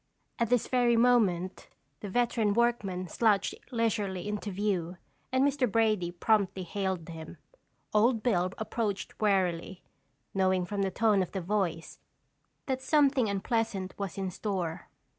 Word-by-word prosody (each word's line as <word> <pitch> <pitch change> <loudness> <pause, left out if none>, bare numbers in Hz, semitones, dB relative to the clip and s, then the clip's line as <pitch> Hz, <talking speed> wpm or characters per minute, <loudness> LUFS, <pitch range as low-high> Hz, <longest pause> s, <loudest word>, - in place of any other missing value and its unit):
At 235 -2 +1
this 245 -2 +2
very 245 -2 +3
moment 205 -7 +2 0.3
the 205 - -6
veteran 225 -1 +1
workman 210 -6 0
slouched 205 +2 +2 0.2
leisurely 210 -5 -1
into 210 0 -3
view 185 -3 -2 0.3
and 260 +1 +3
Mr. 275 -5 +1
Brady 215 -5 +2
promptly 195 +1 +1
hailed 190 -2 -3
him. 160 -1 -9 0.6
Old 225 +1 +3
Bill 185 -7 +1
approached 220 -2 -3
warily, 190 -3 0 0.5
knowing 185 -1 +2
from 200 +2 -3
the 195 - +1
tone 210 0 +2
of 185 - -4
the 190 - -2
voice, 175 -3 -2 0.7
that 260 -1 -2
something 270 -4 +3
unpleasant 200 -1 -1
was 200 -3 -5
in 190 -1 -2
store. 185 -4 -3
205 Hz, 135 wpm, -29 LUFS, 185-230 Hz, 0.7 s, very